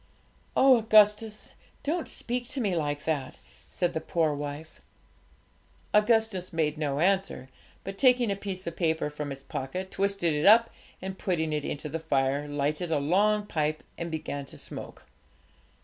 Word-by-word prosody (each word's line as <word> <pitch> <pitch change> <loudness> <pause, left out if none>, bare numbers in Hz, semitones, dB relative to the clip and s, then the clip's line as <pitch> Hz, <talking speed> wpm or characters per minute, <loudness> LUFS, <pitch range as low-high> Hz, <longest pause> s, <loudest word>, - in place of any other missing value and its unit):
'Oh, 265 -1 +7
Augustus, 215 -1 +3 0.3
don't 325 +3 -1
speak 245 0 -2
to 270 - -3
me 200 -7 0
like 145 -3 -2
that!' 145 -5 -2 0.3
said 175 -1 -1
the 160 - -2
poor 160 -1 +1
wife. 145 +2 -7 1.1
Augustus 210 -3 +2
made 160 -3 0
no 145 -3 -2
answer, 190 -7 0 0.3
but, 195 0 -7
taking 250 -4 +4
a - - 0
piece 190 -2 -5
of 170 - -4
paper 160 -3 0
from 150 -1 -5
his 135 0 -7
pocket, 180 +10 -5
twisted 195 -4 0
it 150 +3 +1
up, 230 +2 +7 0.3
and, 190 0 -5
putting 160 -4 -1
it 150 -1 -1
into 145 +1 -4
the 160 +2 -4
fire, 140 -2 0
lighted 145 +4 -1
a 160 - +2
long 205 +8 +2
pipe 155 -4 -1
and 170 0 -5
began 155 -3 -4
to - - -12
smoke. - - -8
170 Hz, 160 wpm, -28 LUFS, 150-205 Hz, 1.1 s, Oh